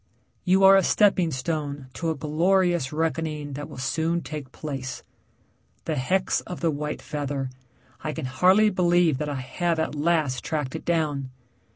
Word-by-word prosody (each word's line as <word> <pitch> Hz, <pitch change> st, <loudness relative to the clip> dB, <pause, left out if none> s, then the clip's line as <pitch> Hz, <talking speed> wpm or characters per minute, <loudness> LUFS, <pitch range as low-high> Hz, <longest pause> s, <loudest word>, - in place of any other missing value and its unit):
You 190 Hz, +1 st, +3 dB
are 195 Hz, 0 st, +9 dB
a 195 Hz, -, +6 dB
stepping 190 Hz, -4 st, +3 dB
stone 145 Hz, 0 st, -3 dB
to 165 Hz, -, -2 dB
a 160 Hz, -, 0 dB
glorious 170 Hz, 0 st, +1 dB
reckoning 155 Hz, -2 st, -2 dB
that 145 Hz, +2 st, -6 dB
will -, -, -10 dB
soon 160 Hz, +6 st, 0 dB
take 150 Hz, -4 st, -7 dB
place. 135 Hz, -5 st, -6 dB, 0.8 s
The -, -, -1 dB
hex 185 Hz, +9 st, +1 dB
of 180 Hz, -, -7 dB
the 165 Hz, -2 st, +1 dB
white 150 Hz, +1 st, -4 dB
feather 140 Hz, -3 st, -3 dB, 0.5 s
I 155 Hz, -, -2 dB
can 155 Hz, -2 st, -5 dB
hardly 185 Hz, -, +4 dB
believe 175 Hz, -5 st, +3 dB
that 150 Hz, -1 st, -2 dB
I 145 Hz, -, -3 dB
have 170 Hz, +6 st, -1 dB
at 160 Hz, -, -1 dB
last 150 Hz, -3 st, 0 dB
tracked 150 Hz, -5 st, -3 dB
it -, -, -6 dB
down. 150 Hz, -6 st, 0 dB
155 Hz, 165 wpm, -25 LUFS, 140-175 Hz, 0.8 s, are